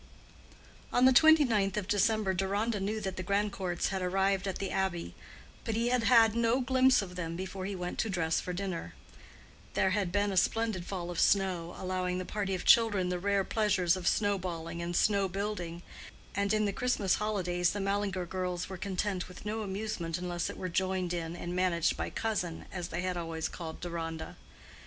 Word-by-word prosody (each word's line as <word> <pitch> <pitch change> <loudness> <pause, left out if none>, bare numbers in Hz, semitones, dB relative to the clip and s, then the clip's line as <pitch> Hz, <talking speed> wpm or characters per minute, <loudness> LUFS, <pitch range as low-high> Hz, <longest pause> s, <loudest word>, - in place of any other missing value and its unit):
On 245 - +4
the 260 - +7
twenty 315 +3 +7
ninth 205 -4 +1
of 200 -3 -2
December 205 -1 +2
Deronda 200 +4 0
knew 210 +3 -2
that 190 -2 -4
the 185 - -3
Grandcourts 200 -2 -1
had 190 -1 -2
arrived 195 +1 +1
at 190 - -2
the 195 - -3
Abbey, 190 -3 -1 0.5
but 225 - -2
he 235 +2 +1
had 245 -2 +1
had 225 -3 +6
no 235 +2 +2
glimpse 260 -2 +4
of 180 -2 -9
them 165 -2 -4
before 190 +1 -5
he 200 - -4
went 180 -1 -5
to 225 - 0
dress 165 -4 +1
for 180 - -4
dinner. 175 - -4 0.8
There 190 - +3
had 195 -3 0
been 205 +1 +1
a 190 - -2
splendid 215 -2 +1
fall 175 -3 -4
of 175 - -4
snow, 185 -4 +2
allowing 185 -1 -2
the 185 - -3
party 195 -1 -2
of 180 - -6
children 205 -6 +5
the 180 0 -1
rare 200 +1 +1
pleasures 190 -5 +2
of 185 -2 -4
snow 205 -2 +2
balling 170 -2 -5
and 175 +1 -3
snow 200 0 +3
building, 180 -3 -4 0.5
and 200 0 0
in 215 0 +2
the 200 - 0
Christmas 215 -6 +1
holidays 180 -4 0
the 205 - -3
Mallinger 195 -2 -1
girls 180 0 -3
were 190 - -6
content 190 0 -2
with 180 - -12
no 220 +1 -2
amusement 190 -5 -3
unless 175 -1 -2
it - - -7
were 185 - -3
joined 185 0 -1
in 165 -1 -3
and 175 0 -5
managed 180 -3 +2
by - - -3
"cousin," 195 -7 -2
as 180 -2 -4
they 170 - -3
had 185 -1 -2
always 165 -1 -3
called 160 -2 -7
Deronda. 165 -2 -5
190 Hz, 195 wpm, -31 LUFS, 175-205 Hz, 0.8 s, the